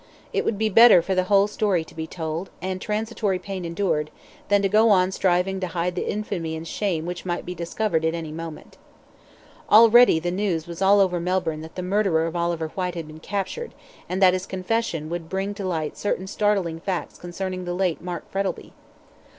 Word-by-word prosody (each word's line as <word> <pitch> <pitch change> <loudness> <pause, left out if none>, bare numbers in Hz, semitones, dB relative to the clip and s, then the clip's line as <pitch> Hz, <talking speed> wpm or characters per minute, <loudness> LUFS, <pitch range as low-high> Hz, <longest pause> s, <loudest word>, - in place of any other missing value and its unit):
It - - +1
would 210 - 0
be 220 +1 +1
better 215 -4 +7
for 190 - -1
the 185 -1 +1
whole 200 +1 +4
story 205 -4 0
to - - -16
be 160 0 -5
told, 160 +2 -4
and 185 +1 -4
transitory 215 -2 -1
pain 190 0 -6
endured, 165 -3 -1 0.4
than 205 0 +3
to - - +4
go 215 +3 +4
on 185 -2 +4
striving 190 +1 +1
to 185 - -2
hide 175 +1 -2
the 180 - -3
infamy 180 -6 -3
and 160 +1 -7
shame 170 -4 -2
which 175 0 -5
might 175 -1 -3
be 180 - -4
discovered 170 0 -1
at 160 +1 +1
any 160 -2 -5
moment. 165 0 -8 0.9
Already 230 -1 +7
the 175 +2 -2
news 180 -4 -1
was 170 +1 -8
all 200 +1 +5
over 180 -2 +2
Melbourne 170 -3 -1
that 160 0 -11
the 180 - -4
murderer 185 -4 +1
of 165 +1 -4
Oliver 170 -2 -1
Whyte 180 0 -3
had 165 -2 -4
been 155 +1 -11
captured, 200 - -4 0.3
and 185 - -2
that 185 -1 +7
his 185 +1 -3
confession 185 -4 -2
would 170 -2 -5
bring 195 +2 -2
to 200 -2 -5
light 160 -4 -2
certain 195 -2 -1
startling 195 -5 0
facts 185 0 -4
concerning 185 +1 -5
the 175 0 -3
late 180 -3 0
Mark 175 -1 -6
Frettlby. 195 -2 -3
185 Hz, 200 wpm, -24 LUFS, 170-200 Hz, 0.9 s, better